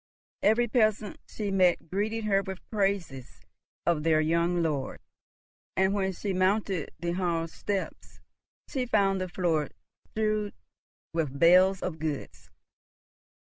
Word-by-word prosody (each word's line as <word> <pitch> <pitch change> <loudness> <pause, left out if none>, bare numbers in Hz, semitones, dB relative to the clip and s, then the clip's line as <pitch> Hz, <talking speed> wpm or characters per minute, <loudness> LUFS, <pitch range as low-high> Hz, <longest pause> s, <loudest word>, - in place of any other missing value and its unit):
Every 235 +3 +3
peasant 215 -4 +1
she 205 -2 -4
met 185 -3 +3
greeted 215 +4 -1
her 200 -2 +2
with 190 -1 -8
praises 195 - -2 0.4
of 170 -3 +2
their 155 0 +3
young 170 +2 +1
lord, 145 -5 -2 0.8
and, 190 +1 +3
when 190 -1 0
she 195 +2 -3
mounted 185 -2 +1
the 170 0 -2
hall 170 -2 -1
steps, 195 +4 -5 0.5
she 255 -3 -2
found 195 -4 +2
the 185 - -3
floor 170 -4 0 0.4
strewn 215 -1 -1 0.6
with 150 -5 -2
bales 185 +4 +5
of 160 -3 -4
goods. 90 - -5
185 Hz, 125 wpm, -28 LUFS, 165-205 Hz, 0.8 s, bales